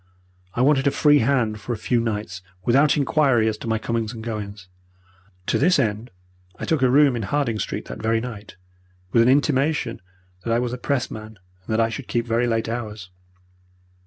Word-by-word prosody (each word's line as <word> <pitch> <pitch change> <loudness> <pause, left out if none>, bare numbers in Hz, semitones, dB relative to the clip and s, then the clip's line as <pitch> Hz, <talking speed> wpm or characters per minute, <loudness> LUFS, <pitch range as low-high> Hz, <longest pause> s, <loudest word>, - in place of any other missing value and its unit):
I 120 - +1
wanted 135 +1 +3
a - - +6
free 145 +1 +4
hand 115 -4 +1
for 120 - -3
a - - -4
few 120 +3 0
nights, 105 -5 -3 0.2
without 140 +5 +4
inquiry 130 -3 +3
as 110 - 0
to - - -7
my 110 0 +1
comings 115 0 -2
and 110 -1 -8
goings. 105 -4 -6 0.8
To - - +1
this 180 +6 +4
end 110 -2 -1 0.5
I - - -5
took 160 -4 0
a 130 - +4
room 140 0 +5
in 115 - -2
Harding 115 +1 -1
Street - - -4
that - - -8
very 115 +1 +1
night, 110 -5 -8 0.6
with 115 - +4
an 115 - +4
intimation 140 -3 +1 0.4
that 115 - -2
I - - +3
was 120 0 -1
a 125 - -5
Pressman, 110 -6 -3
and 90 0 -34
that 110 0 0
I 115 0 +3
should 125 +3 -6
keep 115 -1 -1
very 120 +1 +1
late 115 -1 0
hours. 110 -5 -5
115 Hz, 195 wpm, -23 LUFS, 110-130 Hz, 0.8 s, a